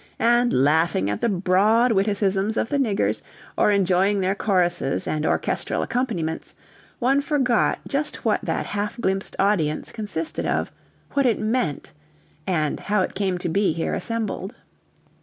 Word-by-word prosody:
And 240 Hz, +1 st, +3 dB
laughing 145 Hz, -, +2 dB
at 105 Hz, -, -4 dB
the 235 Hz, -, +2 dB
broad 205 Hz, +6 st, +3 dB
witticisms 200 Hz, 0 st, +1 dB
of -, -, 0 dB
the 285 Hz, -, 0 dB
niggers, 215 Hz, -7 st, 0 dB, 0.3 s
or -, -, +3 dB
enjoying 195 Hz, 0 st, +2 dB
their 190 Hz, 0 st, +1 dB
choruses 175 Hz, -8 st, 0 dB
and 155 Hz, 0 st, -1 dB
orchestral -, -, -1 dB
accompaniments, 190 Hz, -11 st, -3 dB, 0.4 s
one 270 Hz, +3 st, +2 dB
forgot 265 Hz, -6 st, +1 dB
just 290 Hz, +2 st, -2 dB
what -, -, +2 dB
that -, -, -2 dB
half 205 Hz, +3 st, -3 dB
glimpsed 195 Hz, -3 st, -1 dB
audience 185 Hz, -7 st, +1 dB
consisted 205 Hz, -7 st, -4 dB
of; -, -, -1 dB, 0.4 s
what 280 Hz, -2 st, +2 dB
it 230 Hz, -, +2 dB
meant, 215 Hz, -, -2 dB, 0.5 s
and 155 Hz, -5 st, 0 dB
how 205 Hz, -2 st, +1 dB
it -, -, -4 dB
came 190 Hz, -2 st, -1 dB
to 175 Hz, -, -3 dB
be 195 Hz, +1 st, +2 dB
here 165 Hz, 0 st, -2 dB
assembled. 225 Hz, -1 st, -3 dB
200 Hz, 145 wpm, -23 LUFS, 175-230 Hz, 0.5 s, And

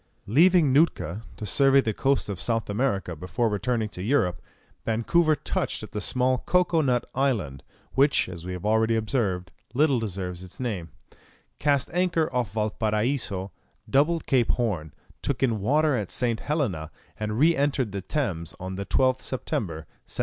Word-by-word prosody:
Leaving 160 Hz, -, +5 dB
Nootka, 115 Hz, -, +2 dB, 0.2 s
to 105 Hz, -, -5 dB
survey 135 Hz, +6 st, +4 dB
the 110 Hz, -5 st, 0 dB
coast 135 Hz, +5 st, +1 dB
of 100 Hz, -3 st, -4 dB
South 115 Hz, -3 st, 0 dB
America 100 Hz, -6 st, -1 dB
before 90 Hz, +8 st, -1 dB
returning 110 Hz, +2 st, 0 dB
to 90 Hz, -, -8 dB
Europe, 95 Hz, -6 st, +1 dB, 0.4 s
Vancouver 155 Hz, +9 st, +2 dB
touched -, -, -2 dB
at -, -, -9 dB
the 105 Hz, -, -3 dB
small 130 Hz, +2 st, +1 dB
Cocoa 180 Hz, -1 st, +2 dB
Nut 125 Hz, -4 st, +1 dB
Island 110 Hz, -, 0 dB, 0.3 s
which, 140 Hz, +2 st, +3 dB
as 85 Hz, -2 st, -8 dB
we 90 Hz, +1 st, -5 dB
have 90 Hz, +2 st, -6 dB
already 110 Hz, +1 st, +3 dB
observed, 105 Hz, -6 st, -1 dB, 0.2 s
little 140 Hz, -2 st, +3 dB
deserves 95 Hz, -4 st, -4 dB
its 90 Hz, -, -12 dB
name 100 Hz, -10 st, -3 dB, 0.7 s
cast 140 Hz, -2 st, +1 dB
anchor 170 Hz, -4 st, +1 dB
off 125 Hz, -6 st, 0 dB
Valparaiso, 105 Hz, -1 st, -1 dB, 0.4 s
doubled 155 Hz, +5 st, +2 dB
Cape 125 Hz, -4 st, +2 dB
Horn, 95 Hz, -11 st, -1 dB, 0.3 s
took -, -, -1 dB
in 115 Hz, -5 st, +1 dB
water 150 Hz, +6 st, +3 dB
at 105 Hz, -6 st, -2 dB
St. 120 Hz, -3 st, -1 dB
Helena, 110 Hz, -, -2 dB, 0.3 s
and 105 Hz, 0 st, -2 dB
re 160 Hz, +5 st, +5 dB
entered 140 Hz, -6 st, 0 dB
the 100 Hz, 0 st, -4 dB
Thames 90 Hz, -, -3 dB
on 95 Hz, +1 st, -5 dB
the 100 Hz, -, -5 dB
12th 130 Hz, 0 st, +2 dB
September, 85 Hz, -10 st, -3 dB, 0.2 s
1795. -, -, -6 dB
115 Hz, 160 wpm, -26 LUFS, 95-140 Hz, 0.7 s, Leaving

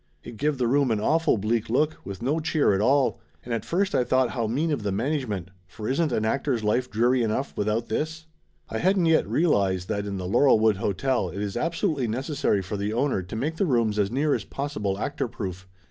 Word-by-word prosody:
It 120 Hz, -2 st, -9 dB
give 150 Hz, +4 st, 0 dB
the 125 Hz, -, 0 dB
room 135 Hz, +2 st, +2 dB
an 110 Hz, -2 st, +1 dB
awful 160 Hz, +5 st, +2 dB
bleak 110 Hz, +2 st, -1 dB
look, 150 Hz, +6 st, +1 dB
with 100 Hz, +3 st, -7 dB
no 145 Hz, +6 st, +1 dB
cheer 155 Hz, -7 st, +2 dB
at 95 Hz, -, +1 dB
all, 135 Hz, +4 st, +2 dB, 0.3 s
and 120 Hz, -, -3 dB
at 115 Hz, -, -2 dB
first 195 Hz, +3 st, 0 dB
I -, -, +3 dB
thought 130 Hz, +1 st, +2 dB
how 115 Hz, -3 st, -1 dB
mean 150 Hz, +9 st, 0 dB
of 140 Hz, -6 st, -1 dB
the 105 Hz, -1 st, -2 dB
management, 105 Hz, -, -2 dB, 0.2 s
for 105 Hz, +3 st, -7 dB
isn't 145 Hz, +3 st, +1 dB
an 110 Hz, -2 st, 0 dB
actor's 130 Hz, 0 st, 0 dB
life 120 Hz, +4 st, +1 dB
dreary 120 Hz, +4 st, +2 dB
enough 115 Hz, +5 st, -1 dB
without 110 Hz, +3 st, -1 dB
this? 160 Hz, +1 st, -3 dB, 0.4 s
I 110 Hz, -, -4 dB
didn't 185 Hz, 0 st, +3 dB
yet 160 Hz, -1 st, +3 dB
realize 100 Hz, -, +2 dB
that 100 Hz, 0 st, -3 dB
in 100 Hz, -1 st, -3 dB
the 90 Hz, -, -4 dB
Laurelwood 110 Hz, -1 st, +4 dB
Hotel 100 Hz, +2 st, 0 dB
it 100 Hz, +4 st, -4 dB
is 100 Hz, -1 st, -4 dB
absolutely 160 Hz, -, 0 dB
necessary 120 Hz, -4 st, 0 dB
for 100 Hz, +3 st, -4 dB
the 100 Hz, +2 st, -2 dB
owner 125 Hz, -4 st, +1 dB
to 90 Hz, +4 st, -8 dB
make 150 Hz, +8 st, -2 dB
the 195 Hz, -, +1 dB
rooms 115 Hz, -6 st, +1 dB
as 100 Hz, -1 st, +2 dB
near 140 Hz, +5 st, +1 dB
as -, -, -1 dB
possible 105 Hz, -9 st, -3 dB
actor 135 Hz, +4 st, -2 dB
proof. 95 Hz, -4 st, -6 dB
120 Hz, 220 wpm, -25 LUFS, 105-145 Hz, 0.4 s, Laurelwood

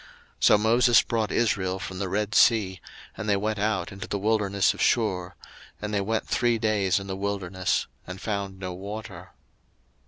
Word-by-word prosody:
02:015:022 -, -, -20 dB, 0.4 s
So 105 Hz, -, +7 dB
Moses 115 Hz, +3 st, +5 dB
brought 110 Hz, -2 st, -1 dB
Israel 95 Hz, -5 st, 0 dB
from 90 Hz, 0 st, -6 dB
the 100 Hz, -2 st, -2 dB
Red 105 Hz, +3 st, -1 dB
sea, 100 Hz, -8 st, +4 dB, 0.3 s
and 110 Hz, -1 st, -4 dB
they 100 Hz, -, +4 dB
went 105 Hz, +1 st, -2 dB
out 100 Hz, -4 st, -1 dB
into 95 Hz, 0 st, -7 dB
the 100 Hz, -, -2 dB
wilderness 100 Hz, -1 st, +1 dB
of -, -, -7 dB
Shur; 90 Hz, -6 st, +1 dB, 0.4 s
and 105 Hz, 0 st, -5 dB
they 100 Hz, -, +1 dB
went 110 Hz, +3 st, -1 dB
three 120 Hz, -1 st, +1 dB
days 105 Hz, -4 st, +1 dB
in 100 Hz, -, -8 dB
the 95 Hz, -1 st, -4 dB
wilderness, 95 Hz, -2 st, -1 dB, 0.2 s
and 90 Hz, +1 st, -7 dB
found 100 Hz, -3 st, -3 dB
no 90 Hz, -1 st, -5 dB
water. 100 Hz, +4 st, -8 dB
100 Hz, 180 wpm, -26 LUFS, 95-110 Hz, 0.4 s, So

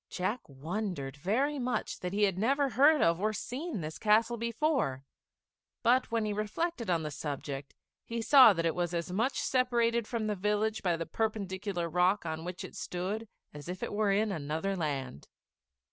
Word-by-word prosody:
Jack 190 Hz, +7 st, -1 dB
wondered 155 Hz, 0 st, -4 dB
very 260 Hz, -, 0 dB
much 250 Hz, 0 st, -2 dB
that 180 Hz, -, -4 dB
he 205 Hz, +2 st, +1 dB
had 195 Hz, -3 st, +3 dB
never 275 Hz, +8 st, +2 dB
heard 285 Hz, +6 st, +5 dB
of 165 Hz, +2 st, +2 dB
or 215 Hz, +1 st, +1 dB
seen 255 Hz, -, -4 dB
this 155 Hz, 0 st, -6 dB
castle 225 Hz, +2 st, +3 dB
before; 235 Hz, -, 0 dB, 0.8 s
but 250 Hz, +3 st, +3 dB
when 230 Hz, -2 st, 0 dB
he 210 Hz, -, -1 dB
reflected 220 Hz, -, -2 dB
on 170 Hz, -2 st, +1 dB
the 150 Hz, -, -4 dB
subject, 140 Hz, -2 st, -5 dB, 0.3 s
he 230 Hz, 0 st, -4 dB
saw 255 Hz, 0 st, +8 dB
that 165 Hz, -4 st, -1 dB
it 165 Hz, -, +2 dB
was 175 Hz, -1 st, -2 dB
as 170 Hz, +1 st, -3 dB
much 230 Hz, +9 st, 0 dB
separated 235 Hz, -3 st, +1 dB
from 230 Hz, -3 st, -2 dB
the 210 Hz, -, 0 dB
village 210 Hz, +3 st, 0 dB
by 175 Hz, -3 st, +1 dB
the 165 Hz, -, -3 dB
perpendicular 200 Hz, -4 st, -2 dB
rock 180 Hz, +4 st, +2 dB
on 160 Hz, 0 st, -4 dB
which 180 Hz, +1 st, -6 dB
it -, -, -9 dB
stood 195 Hz, +6 st, -4 dB, 0.3 s
as 150 Hz, +3 st, -9 dB
if 180 Hz, +1 st, -5 dB
it -, -, -3 dB
were 205 Hz, -1 st, +2 dB
in 210 Hz, +2 st, +2 dB
another 160 Hz, +4 st, -2 dB
land. 140 Hz, -, -3 dB
205 Hz, 180 wpm, -31 LUFS, 170-230 Hz, 0.8 s, saw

